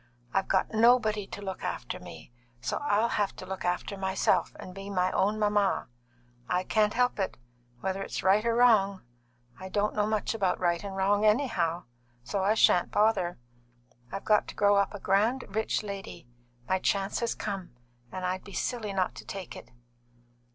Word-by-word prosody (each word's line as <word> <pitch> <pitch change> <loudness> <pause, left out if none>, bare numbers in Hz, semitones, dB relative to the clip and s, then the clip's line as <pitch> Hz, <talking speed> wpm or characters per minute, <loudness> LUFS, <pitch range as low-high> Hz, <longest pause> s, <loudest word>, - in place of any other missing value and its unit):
I've 195 - +1
got 190 +2 +1
nobody 220 -3 +4
to 205 - -8
look 190 -1 -5
after - - -4
me, 80 +7 -11 0.3
so 120 - -2
I'll 230 -5 +2
have 205 -3 -1
to - - -9
look 190 0 -5
after 180 +3 -1
myself 190 -1 +1
and 185 - -9
be 195 +1 -8
my 185 -2 +1
own 210 +2 +1
mamma. 205 -6 +1 0.6
I 180 0 +1
can't 215 +1 +1
help 250 -2 +2
it, 190 - -2 0.4
whether 190 0 -2
it's - - -4
right 195 +3 +4
or 230 0 +1
wrong. 210 -6 +4 0.6
I 190 0 -7
don't 205 +2 0
know 210 0 +1
much 215 0 0
about 195 -5 0
right 175 0 +1
and 195 -1 -6
wrong, 200 +2 +2
anyhow, 210 - +2 0.4
so 190 +10 -2
I 205 +3 +3
shan't 180 -5 +4
bother. 205 -5 +2 0.7
I've - - -5
got 210 -1 +3
to - - -8
grow 205 0 +4
up 200 +1 +1
a - - -6
grand, 215 +8 +2
rich 220 +2 -1
lady; 200 -9 -7 0.4
my 190 - +1
chance 195 +1 0
has 235 -1 -1
come, 195 - -5 0.4
and 185 -1 -4
I'd 185 +1 -2
be 200 - -12
silly 220 -1 -2
not 185 -1 0
to - - -8
take 195 -2 -7
it." - - -11
200 Hz, 180 wpm, -29 LUFS, 190-215 Hz, 0.7 s, nobody